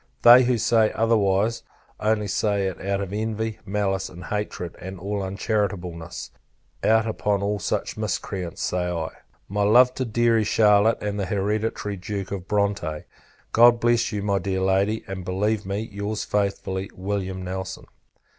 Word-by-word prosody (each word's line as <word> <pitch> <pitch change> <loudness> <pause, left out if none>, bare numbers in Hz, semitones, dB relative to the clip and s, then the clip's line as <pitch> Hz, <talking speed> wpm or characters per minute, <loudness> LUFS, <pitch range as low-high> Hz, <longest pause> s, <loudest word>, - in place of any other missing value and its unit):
They 120 +1 +9
who 125 -1 +2
say 110 0 +3
otherwise, 110 -1 +2 0.4
only 105 -1 +1
say 100 0 0
it 95 -2 -4
out 100 +1 -1
of 100 0 -5
envy, 110 +1 -2
malice 95 -1 -1
and 90 0 -11
hatred, 105 -5 -4
and 95 +1 -7
all 100 +2 -3
uncharitableness; 95 -4 -3 0.5
out 110 0 +4
upon 105 -2 -1
all 105 0 -1
such - - -2
miscreants! 90 0 -3
say 90 -1 -1
I. 80 -2 -2 0.4
My 105 +1 -2
love 125 +5 +6
to 130 - -2
deary, 115 0 +2
Charlotte, 105 +1 +4
and 105 0 -2
the 95 - -1
hereditary 105 +1 -1
Duke 100 +1 -5
of 95 -2 -5
Bronte. 100 -7 -1 0.5
God 120 +1 +6
bless 120 -1 +2
you, 105 -2 -3
my 100 -1 +1
dear 95 +1 -2
Lady; 95 +3 +1
and 95 -1 -5
believe 100 +3 -1
me, 100 +2 -2
your's 105 0 -4
faithfully, 100 -1 -2
Wm. 95 -1 -3
NELSON. 95 +1 -5
100 Hz, 155 wpm, -24 LUFS, 95-110 Hz, 0.5 s, They